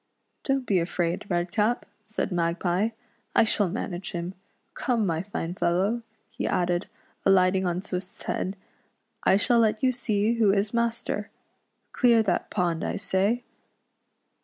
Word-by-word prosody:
" - - -49
Don't 270 -2 +1
be 195 -5 +3
afraid. 170 +2 -1
Redcap," 195 +7 +1 0.2
said 215 -1 -2
Magpie, 175 +4 +1 0.2
" 235 - -40
I - - +7
shall 210 -3 +3
manage 185 -2 -4
him. 175 +1 -3 0.4
Come, 235 -4 0
my 165 -3 0
fine 175 -3 -4
fellow," 190 +7 +1 0.3
he 230 - -3
added, 175 0 0 0.4
alight 185 -1 +5
ing 190 -1 +1
on 175 +1 -1
Swift's 185 -1 -5
head, 190 +2 -2 0.3
" - - -48
I 190 - +6
shall 235 +3 +4
let 215 0 +2
you 255 - +5
see 220 -3 0
who 210 -3 +5
is 205 +2 0
master! 235 0 -1 0.6
Clear 235 -3 +4
that - - 0
pond, 175 -4 0
I - - -1
say." 200 +4 +1
195 Hz, 155 wpm, -26 LUFS, 180-225 Hz, 0.6 s, I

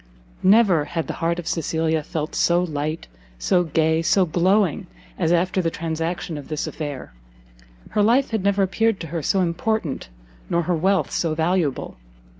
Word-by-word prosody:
Never 190 -6 +5
had 165 0 -3
the - - -4
heart 170 +1 +1
of 175 - -5
Cecilia 160 -1 0
felt 155 0 -4
so 175 +1 +2
light, 155 -1 -3 0.3
so 175 - +2
gay, 160 0 +1
so 185 +3 +3
glowing 180 +1 +1 0.3
as 165 -2 +1
after 180 +2 +2
the 165 - 0
transaction 165 0 -3
of 140 - -11
this 155 -1 -3
affair: 145 - -6 0.8
her 210 - +1
life 240 +6 +3
had 220 -4 -1
never 200 0 +2
appeared 225 +2 +1
to 165 - -5
her 165 - -1
so 190 +6 +1
important, 175 - -1 0.4
nor 170 0 +1
her 175 +1 0
wealth 190 +4 +1
so 160 -2 0
valuable. 160 -3 -1
170 Hz, 165 wpm, -22 LUFS, 160-190 Hz, 0.8 s, Never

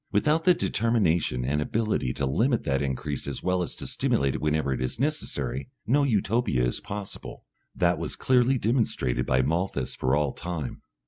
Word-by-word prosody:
Without 150 +10 +2
the 180 -1 +6
determination 85 - +1
and 75 +3 0
ability 105 - 0
to 70 0 -1
limit 115 - +1
that 70 -1 0
increase 70 +1 -3
as - - -4
well 90 0 +1
as 85 - -3
to - - -7
stimulate 70 -1 +1
it - - -4
whenever 75 -2 +1
it 65 - -3
is 65 - -3
necessary, 70 - -2 0.2
no 140 +6 +3
Utopia 110 - +1
is - - -1
possible. 100 -1 -7 0.3
That - - +2
was - - -3
clearly 130 +1 +3
demonstrated 110 - 0
by 65 0 +3
Malthus 80 -2 -1
for 65 +2 +1
all 75 -2 +1
time. 85 -7 -5
85 Hz, 175 wpm, -27 LUFS, -, 0.3 s, the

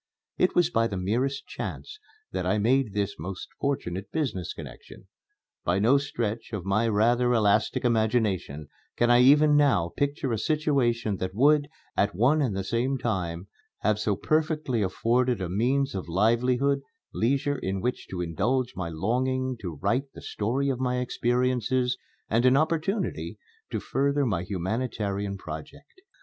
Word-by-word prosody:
It 180 - +2
was 175 -1 +3
by 115 -5 +2
the 100 - -4
merest 120 +9 -1
chance 430 0 -6 0.3
that - - -2
I 110 - +1
made 120 0 +2
this 100 -3 -2
most 95 +4 -6
fortunate 100 -9 -2
business 115 - -2
connection. - - -11 0.6
By 90 +2 +1
no 120 +8 +4
stretch 115 -6 -4
of 95 -5 -4
my 110 +4 +2
rather 120 +3 +3
elastic 110 +2 +2
imagination 110 - 0 0.3
can 120 0 +3
I 120 0 +6
even 150 +3 +6
now 135 - +3
picture 140 -2 -1
a 110 - -1
situation 120 -7 +1
that 95 +1 -4
would, 145 +4 +4 0.3
at 100 -2 +1
one 135 - +3
and 115 -9 0
the 95 - -2
same 125 +7 0
time, 90 -7 -3 0.3
have 105 0 +1
so 105 -1 +1
perfectly 155 - 0
afforded 120 +5 +1
a 90 -2 -3
means 130 +8 +1
of 95 -3 -5
livelihood, 125 +8 +2 0.3
leisure 140 +3 0
in 95 -3 -2
which 125 +6 -3
to 90 -2 -4
indulge 120 +10 0
my 90 -2 -3
longing 130 +9 -1
to 90 -6 -5
write 135 +3 0
the - - -10
story 130 +7 -1
of 130 -2 -1
my 125 -1 0
experiences, 125 0 0 0.3
and 115 +2 +2
an 130 +1 +5
opportunity 165 +6 -1 0.3
to - - -2
further 140 +1 0
my 105 -8 0
humanitarian 100 +1 -2
project. 90 - -10
120 Hz, 155 wpm, -27 LUFS, 100-135 Hz, 0.6 s, I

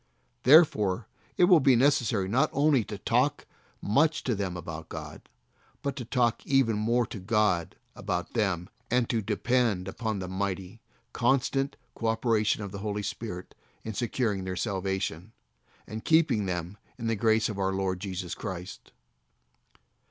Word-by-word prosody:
Therefore 115 - +5 0.3
it - - +4
will 175 -2 +7
be 135 -2 +5
necessary 120 -6 +2
not 120 +7 +2
only 140 -3 +3
to 105 - -6
talk 125 +8 +1 0.4
much 150 +9 +2
to 125 - 0
them 95 -4 -3
about 80 -2 -7
God, - - -8 0.5
but 140 -1 -2
to 125 - -5
talk 120 -1 +1
even 135 -5 +2
more 115 +3 +1
to 105 - -8
God 95 -4 +1 0.2
about 90 0 -3
them, 95 -6 0 0.2
and 125 0 +2
to 115 -2 0
depend 110 -2 0
upon 110 +2 -3
the 95 -1 -4
mighty, 95 +2 -4 0.3
constant 135 +2 +1 0.2
co 115 - -3
operation 110 -2 +1
of 100 - -6
the 100 - -6
Holy 105 0 -3
Spirit 95 -3 -6 0.3
in 110 - -5
securing 110 -3 -1
their 95 0 -4
salvation, 95 -1 -3 0.5
and 110 +1 -7
keeping 160 -11 +3
them 90 +2 -4 0.2
in 115 - -6
the 115 0 +1
grace 110 +1 +2
of 105 -3 -5
our 95 0 +1
Lord 95 -1 -1
Jesus 90 -2 -4
Christ. 95 -3 -7
110 Hz, 150 wpm, -28 LUFS, 95-120 Hz, 0.5 s, will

